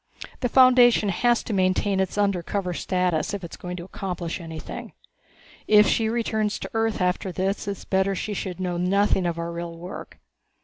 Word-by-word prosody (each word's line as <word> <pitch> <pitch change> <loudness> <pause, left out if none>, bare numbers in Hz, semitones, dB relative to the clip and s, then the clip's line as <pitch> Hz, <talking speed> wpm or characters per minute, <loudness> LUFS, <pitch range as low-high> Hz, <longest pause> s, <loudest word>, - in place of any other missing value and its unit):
The 245 - -1
Foundation 245 -4 +6
has 240 +6 +2
to 220 - -4
maintain 190 +1 +1
its 190 +1 -1
undercover 195 -2 0
status 180 +1 0
if 195 - -7
it 170 - -8
is - - -5
going 180 0 -6
to 170 - -6
accomplish 180 -2 -5
anything. 160 -2 -8 0.7
If 210 0 +7
she 220 -1 +2
returns 220 -2 -1
to - - -7
Earth 225 -1 0
after 180 +1 0
this 195 +3 -2
it's 200 -1 -5
better 190 0 +1
that - - -4
she 210 +3 -3
should 185 -2 -5
know 180 -2 -2
nothing 190 +1 +2
of 170 -1 -2
our 170 0 -3
real 170 0 -6
work. 175 +3 -9
190 Hz, 185 wpm, -24 LUFS, 180-210 Hz, 0.7 s, If